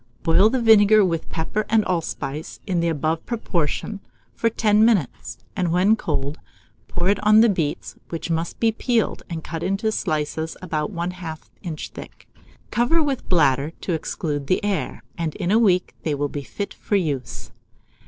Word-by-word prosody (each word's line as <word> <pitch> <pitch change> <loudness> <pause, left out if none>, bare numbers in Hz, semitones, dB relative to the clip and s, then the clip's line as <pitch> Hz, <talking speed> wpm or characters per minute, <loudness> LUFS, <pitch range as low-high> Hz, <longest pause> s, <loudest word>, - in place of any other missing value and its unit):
Boil 190 +6 +5
the 260 - 0
vinegar 215 -2 +6
with 165 -3 -2
pepper 170 +6 -2
and 220 -1 +3
allspice, 160 -4 -3
in 180 -3 0
the 170 - +1
above 160 0 -1
proportion, 200 -3 -2 0.3
for 230 - +1
ten 215 -1 +3
minutes, 160 - +1 0.2
and 180 -2 0
when 185 +5 +4
cold, 150 -6 -3 0.5
pour 175 +1 -1
it 200 +1 +2
on 215 +1 +7
the 230 - +6
beets, 165 -7 -2
which 165 0 -4
must 165 +1 -2
be 225 -1 +3
peeled 230 0 0
and 165 -2 -5
cut 165 -1 -5
into 195 +4 0
slices 155 -3 -2
about 160 0 -2
1/2 175 -2 -4 0.2
inch 165 -5 -5
thick. - - -12 0.4
Cover 255 +8 +3
with 280 -3 -2
bladder 145 -3 +3
to 180 - -2
exclude 150 -2 -3
the 185 +5 +1
air, 200 -2 -2 0.2
and 160 -2 -2
in 180 -2 -1
a 220 - +5
week 185 -6 +2
they 155 -2 -1
will 145 0 -1
be 145 - -4
fit 200 +8 -5
for 205 - -2
use. 135 - -2
175 Hz, 170 wpm, -23 LUFS, 155-210 Hz, 0.5 s, on